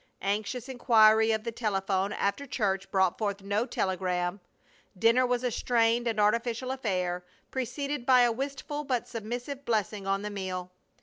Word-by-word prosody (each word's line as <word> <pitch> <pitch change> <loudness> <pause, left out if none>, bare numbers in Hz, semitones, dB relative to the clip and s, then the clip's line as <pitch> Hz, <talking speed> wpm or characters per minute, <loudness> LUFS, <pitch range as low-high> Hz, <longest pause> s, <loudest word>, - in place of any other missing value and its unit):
Anxious 215 +5 -2
inquiry 220 -4 +5
of 220 -1 0
the 230 - -3
telephone 195 -3 -1
after 210 +10 -1
church 195 -6 -1
brought 190 -2 +2
forth 200 -2 -2
no 205 +5 0
telegram. 185 -2 -1 0.6
Dinner 230 +5 +4
was 245 0 0
a 250 - 0
strained 235 +1 +2
and 225 -2 0
artificial 230 +4 +1
affair, 180 -8 -2 0.3
preceded 270 +2 -3
by 255 0 +6
a 240 -1 +4
wistful 280 +4 -4
but 255 -4 -1
submissive 245 +5 -5
blessing 210 -4 -1
on 195 +1 0
the 210 - -4
meal. 185 -2 -4
220 Hz, 150 wpm, -29 LUFS, 195-245 Hz, 0.6 s, by